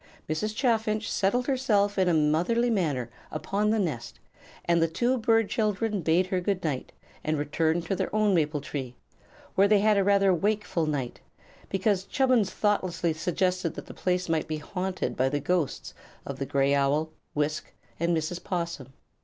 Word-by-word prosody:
Mrs. 210 +8 -2
Chaffinch 220 -3 0
settled 245 +6 +1
herself 210 -7 +1
in 185 -1 +3
a - - +3
motherly 175 +11 +2
manner 145 - 0 0.2
upon 195 +7 -1
the 220 - +2
nest, 160 - -3 0.5
and 170 -1 +3
the 165 - +4
two 240 +10 +1
bird 225 -1 +3
children 210 -1 0
bade 165 +3 +3
her 185 0 -1
good 190 0 -1
night 145 -6 -2 0.3
and 155 0 0
returned 160 +3 0
to 195 - -1
their - - -2
own 215 -2 +3
maple 150 -3 +1
tree, 130 -3 -5 0.6
where 195 +1 +4
they 210 0 +5
had 210 +1 +3
a - - +3
rather 195 -1 +4
wakeful 195 -3 0
night, 135 -5 -3 0.5
because 195 0 +1
Chubbins 255 -7 +2
thoughtlessly 185 -6 0
suggested 180 +1 -1
that - - -7
the - - -10
place 180 0 -1
might 165 -1 0
be 155 -1 -2
haunted 180 -5 -3
by 130 +1 +2
the 145 +1 -1
ghosts 165 -2 -1 0.3
of 140 -1 -6
the 135 - -3
gray 140 0 +2
owl, 145 +3 +1 0.2
Wisk, 150 +1 -1 0.3
and 170 0 +2
Mrs. 165 +3 -3
'Possum. 170 -8 -4
180 Hz, 170 wpm, -27 LUFS, 155-205 Hz, 0.6 s, they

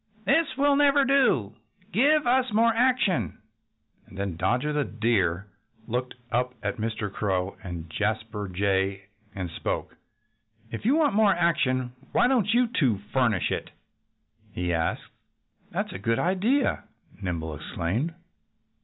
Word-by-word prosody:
"This 320 - +2
will 285 0 +4
never 285 -1 +4
do. 255 - +3 0.4
Give 290 +5 +3
us 255 0 +2
more 230 +2 +4
action!" 230 - +1 0.7
And 95 - -14
then 100 -3 -3
Dodger 120 - 0
the 150 -1 +1
Deer 100 -7 0 0.4
looked 125 +2 -3 0.2
up 125 +1 0
at 105 -1 -2
Mr. 110 -2 -3
Crow 95 -2 -1
and 85 -3 -6
Jasper 105 +3 -2
Jay 95 +1 0 0.3
and 90 -3 -4
spoke. - - -3 0.8
"If 115 - -6
you 260 +6 +4
want 310 -7 +3
more 205 -2 +4
action 130 -8 +1 0.2
why - - +4
don't 235 -6 +2
you 245 +2 +4
two 140 - +1 0.2
furnish 120 -8 +2
it?" - - -3 0.8
he 90 0 -2
asked. 80 -1 -1 0.7
"That's - - -3
a 95 - -6
good 115 +3 0
idea!" 210 +10 +1 0.4
Nimble 85 -4 -3
exclaimed. 90 - -3
120 Hz, 135 wpm, -26 LUFS, -, 0.8 s, will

